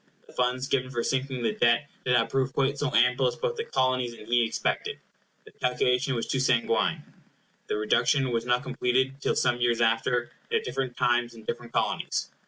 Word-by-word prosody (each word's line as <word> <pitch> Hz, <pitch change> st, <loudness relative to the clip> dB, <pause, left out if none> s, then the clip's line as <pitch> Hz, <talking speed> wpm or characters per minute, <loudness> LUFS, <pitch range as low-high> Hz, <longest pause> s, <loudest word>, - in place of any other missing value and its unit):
The -, -, -17 dB
funds 125 Hz, +1 st, 0 dB
given 130 Hz, -2 st, 0 dB
for 120 Hz, -3 st, -2 dB
sinking 130 Hz, -2 st, -2 dB
the -, -, +2 dB
debt 145 Hz, -, +2 dB, 0.2 s
did 125 Hz, -, +1 dB
not 120 Hz, -, +2 dB
prove 130 Hz, -1 st, 0 dB
quite 140 Hz, +1 st, +1 dB
so 145 Hz, 0 st, 0 dB
ample 125 Hz, +1 st, +3 dB
as 125 Hz, -, -2 dB
both 475 Hz, -, -2 dB
the 450 Hz, -, -3 dB
Colonies 130 Hz, -, 0 dB
and 110 Hz, -, -13 dB
he 120 Hz, 0 st, +3 dB
expected. -, -, -2 dB, 0.5 s
The -, -, -14 dB
calculation 125 Hz, +1 st, 0 dB
was 115 Hz, -, -2 dB
too 135 Hz, -, -1 dB
sanguine; 125 Hz, -3 st, +1 dB, 0.6 s
the -, -, -1 dB
reduction 130 Hz, +5 st, +2 dB
was 115 Hz, -1 st, 0 dB
not 125 Hz, +2 st, +1 dB
completed 130 Hz, +1 st, 0 dB
till -, -, 0 dB
some 120 Hz, 0 st, +1 dB
years 120 Hz, -1 st, +2 dB
after, 120 Hz, +1 st, +1 dB, 0.2 s
and 460 Hz, -, +2 dB
at 450 Hz, -, -4 dB
different 130 Hz, -, -3 dB
times 120 Hz, -1 st, +1 dB
in 110 Hz, -, -12 dB
different 120 Hz, +2 st, -5 dB
Colonies. -, -, -1 dB
125 Hz, 195 wpm, -27 LUFS, 120-135 Hz, 0.6 s, ample